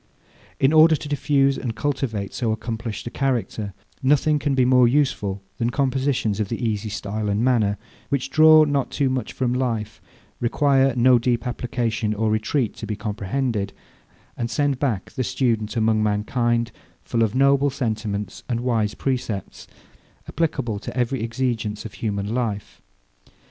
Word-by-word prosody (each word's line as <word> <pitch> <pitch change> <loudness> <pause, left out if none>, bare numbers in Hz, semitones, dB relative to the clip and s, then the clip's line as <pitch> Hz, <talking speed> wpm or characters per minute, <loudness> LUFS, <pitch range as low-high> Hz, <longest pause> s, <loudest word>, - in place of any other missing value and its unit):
In 135 +3 +3
order 160 0 +7
to 150 - -6
diffuse 140 -1 +2
and 120 -4 -4
cultivate 115 -8 -2
so 115 -3 -1
accomplished 110 0 -4
a 120 - -5
character, 120 -6 -1 0.3
nothing 150 +2 +3
can 145 -2 0
be 130 -1 +3
more 125 -1 +5
useful 120 -8 0 0.2
than 115 - +1
compositions 130 -5 0
of 105 -2 -1
the 115 +1 -2
easy 105 0 -2
style 105 +1 -3
and 100 +3 +1
manner, 110 -5 +2 0.3
which 140 0 -1
draw 155 0 +7
not 145 -3 0
too 135 -3 0
much 130 -4 -2
from 125 -2 -1
life, 115 -4 -2 0.4
require 135 +1 +2
no 125 0 +5
deep 120 +1 0
application 115 -3 -2
or 110 +1 0
retreat 110 +3 0
to - - -6
be 105 - -2
comprehended, 105 +1 -2 0.6
and 120 -1 -3
send 140 +2 0
back 115 -10 -1
the 130 - -2
student 110 -4 -1
among 110 -1 +2
mankind 115 +3 0 0.3
full 115 - -1
of 110 0 +1
noble 140 +1 +4
sentiments 110 -6 -3
and 120 -1 -1
wise 115 -4 0
precepts, 120 -7 -3 0.6
applicable 135 -9 -1
to 120 - -7
every 125 +1 0
exigence 115 -3 -2
of 110 - -7
human 105 -1 -3
life. 110 -5 -3
120 Hz, 155 wpm, -23 LUFS, 110-135 Hz, 0.6 s, order